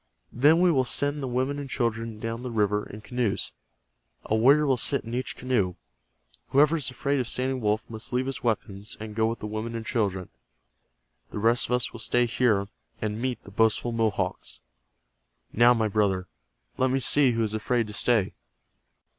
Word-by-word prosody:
Then 150 +7 +5
we 180 0 +4
will 135 -5 +2
send 145 +3 +1
the 135 - -3
women 130 +3 -1
and 140 -1 -6
children 115 -3 -2
down 115 +1 -4
the 125 - -5
river 105 -2 0
in 105 - -9
canoes. 120 -2 -2 0.7
A 110 - 0
warrior 140 +7 +5
will 135 -2 +3
sit 135 +3 +2
in 115 - -8
each 125 +1 -3
canoe. 105 -9 0 0.7
Whoever 150 +4 +4
is 140 -5 -2
afraid 140 +2 -1
of 125 - -1
Standing 130 +1 -1
Wolf 105 +1 0
must 110 -1 -8
leave 125 +1 0
his 135 0 -4
weapons, 105 -3 -2
and 110 0 -7
go 110 +1 +1
with 115 +1 -2
the - - -8
women 110 +2 -4
and 115 0 -5
children. 100 -6 -1 1.0
The - - -7
rest 115 +3 +2
of - - -2
us 125 -1 +1
will - - -8
stay 120 +2 +2
here, 110 -4 +1 0.3
and 110 +1 -3
meet 125 -3 -3
the 100 - -13
boastful 110 +3 +1
Mohawks. 115 -2 -2 0.9
Now, 120 +2 +5
my 110 -1 +1
brother, 95 -3 0 0.5
let 130 0 +3
me 130 - +1
see 135 0 +4
who 115 0 0
is 110 -1 -2
afraid 115 +2 0
to 105 - -9
stay." 110 -3 +1
115 Hz, 190 wpm, -26 LUFS, 110-130 Hz, 1.0 s, Then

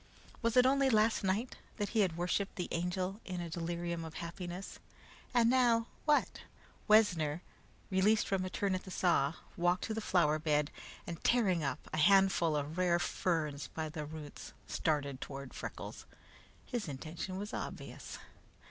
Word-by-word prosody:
Was 230 +1 +1
it 250 - +7
only 275 +1 +4
last 220 -2 +3
night 200 +6 0 0.2
that 205 -2 -1
he 225 - 0
had 180 -5 +2
worshiped 180 +3 -1
the 180 - -3
Angel 180 +4 -2
in 180 -1 -5
a 170 -1 -5
delirium 170 0 -3
of 160 0 -8
happiness? 175 +2 -6 0.5
And 240 -3 +4
now, 240 -2 +4 0.2
what? 300 -1 +2 0.5
Wessner, 175 -7 +4 0.5
released 205 +3 +3
from 195 -1 0
a 185 - -3
turn 195 +1 0
at 185 - -2
the - - -10
saw, 170 -5 +2 0.2
walked 175 +1 +2
to 220 - -2
the 225 - -2
flower 155 -6 +3
bed, 150 -1 +1 0.3
and 170 -1 -6
tearing 195 -9 +3
up 140 - -3
a - - -1
handful 180 -1 +5
of 150 +4 -2
rare 175 -1 +4
ferns 155 -5 -1
by 160 -1 -4
the 155 0 -5
roots, 150 -1 -9
started 140 -4 -1
toward 140 -1 -7
Freckles. - - -7 0.6
His 240 -7 -3
intention 160 +6 -5
was 205 +2 -5
obvious. - - -6
180 Hz, 160 wpm, -34 LUFS, 160-205 Hz, 0.6 s, it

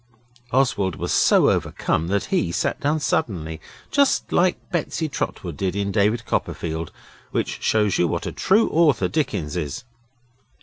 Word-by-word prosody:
Oswald 120 - +1
was - - -3
so - - +5
overcome 80 +1 -1
that 100 +2 0
he 90 - +1
sat 85 - -1
down 150 +2 +1
suddenly, 85 - -2 0.3
just 280 -1 +2
like 180 0 +3
Betsy 165 -1 -1
Trotwood 90 - -4
did 95 +1 -2
in 100 0 -1
David 110 +3 +1
Copperfield, 80 -4 -3 0.4
which - - -2
just - - -14
shows 105 -3 +2
what 85 -1 0
a - - -3
true 210 +4 +3
author 155 -5 +3
Dickens 105 - -2
is. 75 - -4
100 Hz, 145 wpm, -23 LUFS, -, 0.4 s, so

